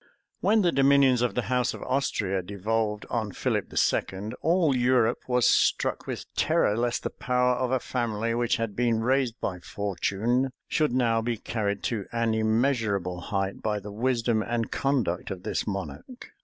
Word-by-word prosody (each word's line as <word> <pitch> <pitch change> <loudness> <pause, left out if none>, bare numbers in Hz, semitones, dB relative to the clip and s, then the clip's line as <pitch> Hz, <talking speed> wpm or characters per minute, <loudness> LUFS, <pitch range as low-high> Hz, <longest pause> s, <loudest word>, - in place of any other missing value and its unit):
When 215 0 +3
the 175 - +3
dominions 135 -3 +4
of 125 - 0
the 125 - 0
house 125 +1 0
of - - -8
Austria 105 -8 0
devolved 105 +3 -2
on 110 -5 -2
Philip - - -1
II., 100 +3 0
all 165 -3 +3
Europe 125 -2 +2
was 125 -1 +2
struck - - +2
with - - -4
terror, 105 - +2
lest 120 +1 -1
the - - -3
power 125 0 +1
of 125 0 -1
a 130 0 +1
family, 115 -2 -2
which 120 0 +1
had 115 -3 -3
been 115 -1 +1
raised 125 -2 +1
by 90 -1 -3
fortune, 105 +7 -1 0.2
should 155 -3 +1
now 115 -3 +2
be 115 0 -2
carried 100 -2 -3
to 110 -5 -2
an 115 -1 0
immeasurable 110 -5 0
height 95 +1 -2
by 105 -1 -1
the 105 +1 -9
wisdom 115 0 +1
and 115 0 -2
conduct 125 -11 0
of 95 -2 -6
this 110 - -2
monarch. 105 - -6
115 Hz, 170 wpm, -27 LUFS, 105-125 Hz, 0.2 s, dominions